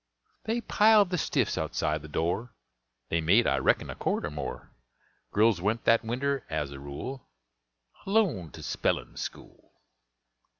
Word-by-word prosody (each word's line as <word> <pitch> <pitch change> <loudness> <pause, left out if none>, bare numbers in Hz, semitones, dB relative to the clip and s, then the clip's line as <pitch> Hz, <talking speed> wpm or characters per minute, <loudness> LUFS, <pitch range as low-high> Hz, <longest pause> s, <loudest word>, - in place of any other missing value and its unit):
They 230 +2 0
piled 210 -4 +5
the 180 - 0
stiffs - - 0
outside 75 0 -1
the 80 - -9
door; 90 +10 -2 0.5
They 85 - +1
made, 100 +9 +4
I 70 - +2
reckon, 65 - +1
a - - -5
cord - - -1
or 75 - -4
more. 75 -2 -6 0.6
Girls 105 -3 +3
went 110 +4 0
that 115 0 +4
winter, 135 +4 -1
as 75 -3 -2
a 70 - -8
rule, 70 - -7 0.8
Alone 195 - +1
to - - -9
spellin' - - -1
school. - - -8
110 Hz, 145 wpm, -28 LUFS, -, 0.8 s, piled